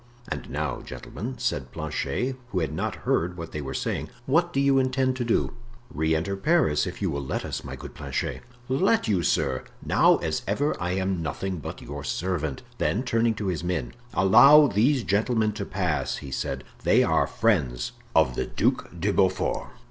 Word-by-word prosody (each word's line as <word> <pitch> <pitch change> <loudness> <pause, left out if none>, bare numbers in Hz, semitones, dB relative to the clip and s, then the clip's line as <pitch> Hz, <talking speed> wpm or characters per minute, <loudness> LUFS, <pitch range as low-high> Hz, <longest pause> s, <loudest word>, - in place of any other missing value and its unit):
"And - - -5
now, - - -2
gentlemen," 125 +7 -7
said 75 - -2
Planchet, 130 +1 -2
who 95 - -1
had 80 -2 -2
not 80 - -2
heard 90 +2 +1
what 85 -1 -6
they 75 - -4
were 65 -2 -5
saying, - - -2 0.2
"what 170 +5 +2
do 135 - 0
you 140 -1 +4
intend 130 0 +1
to 125 - -1
do?" 115 - +1 0.4
"Re 80 +1 +1
enter 95 +5 -1
Paris, 100 - +2
if 90 +3 -6
you 95 - +1
will 70 -1 -2
let 65 - -3
us, - - -4
my - - -6
good - - -9
Planchet." - - -3 0.3
"Let 185 - +2
you, 100 -5 +2
sir? 70 -6 +1 0.2
Now, - - +5
as 80 -2 -2
ever, 145 +10 +1
I 90 +1 0
am 95 -2 -1
nothing 90 +4 -3
but - - -7
your 70 -1 -6
servant." 80 -6 -2 0.2
Then 115 - +1
turning 115 -2 +1
to 105 - -4
his 90 -3 -2
men: 85 -9 -2 0.2
"Allow 140 +10 +8
these 125 +3 +2
gentlemen 110 +2 +1
to 105 -1 -5
pass," 90 -7 -1
he 70 -2 -8
said; - - -3 0.2
"they - - +4
are - - +2
friends 70 - +1 0.2
of 65 - +4
the - - -2
Duc - - 0
de 100 +4 +1
Beaufort." 95 -2 +1
95 Hz, 185 wpm, -26 LUFS, 80-125 Hz, 0.4 s, Allow